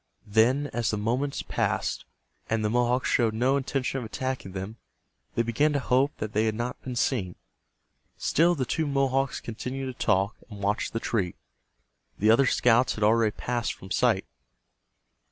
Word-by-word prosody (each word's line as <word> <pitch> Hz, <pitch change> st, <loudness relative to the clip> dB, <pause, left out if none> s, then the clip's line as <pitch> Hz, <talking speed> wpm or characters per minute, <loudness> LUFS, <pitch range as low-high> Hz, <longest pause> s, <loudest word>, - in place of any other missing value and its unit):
Then 115 Hz, +7 st, +3 dB
as 115 Hz, -2 st, 0 dB
the 105 Hz, -, -1 dB
moments 125 Hz, +7 st, -1 dB
passed, -, -, -1 dB, 0.4 s
and 110 Hz, -1 st, 0 dB
the 105 Hz, -, +1 dB
Mohawks 125 Hz, +1 st, +2 dB
showed 115 Hz, -3 st, +2 dB
no 130 Hz, +4 st, +2 dB
intention 135 Hz, -2 st, -1 dB
of -, -, -6 dB
attacking 125 Hz, -3 st, -4 dB
them, 95 Hz, +4 st, -6 dB, 0.6 s
they 115 Hz, -, +2 dB
began 145 Hz, +7 st, +1 dB
to 140 Hz, -, +1 dB
hope 135 Hz, +3 st, +1 dB
that 110 Hz, 0 st, -5 dB
they 110 Hz, +2 st, +2 dB
had 110 Hz, -, 0 dB
not 120 Hz, +2 st, -4 dB
been 125 Hz, -1 st, -6 dB
seen. 105 Hz, -8 st, 0 dB, 0.8 s
Still 170 Hz, +3 st, +3 dB
the 130 Hz, -5 st, -1 dB
two 160 Hz, +5 st, -1 dB
Mohawks 135 Hz, -1 st, +1 dB
continued 125 Hz, +4 st, -5 dB
to -, -, -4 dB
talk, 100 Hz, +1 st, +2 dB
and 100 Hz, -2 st, -9 dB
watch 105 Hz, +2 st, 0 dB
the 115 Hz, -, -3 dB
tree. 100 Hz, -7 st, -1 dB, 0.8 s
The 110 Hz, +2 st, +4 dB
other 135 Hz, +4 st, +5 dB
scouts 125 Hz, +1 st, +3 dB
had 105 Hz, -, -3 dB
already 110 Hz, +1 st, +4 dB
passed 120 Hz, -1 st, -1 dB
from 95 Hz, -, -13 dB
sight. 115 Hz, -6 st, +2 dB
120 Hz, 170 wpm, -27 LUFS, 110-130 Hz, 0.8 s, other